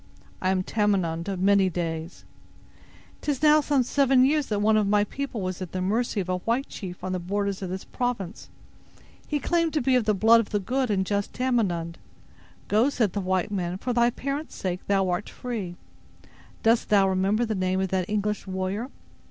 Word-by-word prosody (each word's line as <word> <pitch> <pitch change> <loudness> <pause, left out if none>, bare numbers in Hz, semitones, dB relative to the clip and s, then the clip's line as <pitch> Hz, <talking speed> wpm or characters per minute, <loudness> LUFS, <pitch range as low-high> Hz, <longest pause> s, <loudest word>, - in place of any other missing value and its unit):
"I 185 - +1
am 190 -1 +1
Tamenund 185 -6 0
of 190 -2 -3
many 195 0 +4
days." 165 -1 -4 1.0
"'Tis 290 -1 -2
now 305 0 +6
some 280 -2 +2
seven 265 0 +4
years 295 +1 +2
that 210 - -1
one 215 +2 +3
of 210 -2 +2
thy 205 0 +4
people 255 0 -4
was 185 0 -4
at 185 - -6
the 185 - -2
mercy 215 +4 0
of 185 - -2
a 185 0 -1
white 235 +8 -1
chief 180 -2 -8
on 185 - -3
the 185 - -1
borders 200 +2 -2
of 190 - -4
this 190 +1 -4
province. 230 -6 -4 0.8
He 295 - -1
claimed 335 +1 +1
to 310 - +2
be 260 +1 +2
of 245 -3 +2
the 215 -1 +2
blood 225 +4 +6
of 225 - -2
the 205 - 0
good 255 +5 -1
and 190 -2 +1
just 200 0 -2
Tamenund. 195 -10 -1 0.7
'Go', 220 +7 +3
said 225 -9 0
the 205 - -1
white 185 +2 0
man, 180 -2 -2
'for 250 +5 -2
thy 235 0 +4
parent's 280 +5 -4
sake 180 -1 -3
thou 195 -1 +2
art 180 +3 -2
free.' 215 -8 -5 0.9
Dost 225 +1 +3
thou 200 -2 +5
remember 195 +5 +1
the 220 - -2
name 185 -1 0
of 190 0 -1
that 185 -1 -1
English 210 -1 -1
warrior?" 190 +6 -3
205 Hz, 200 wpm, -26 LUFS, 185-240 Hz, 1.0 s, now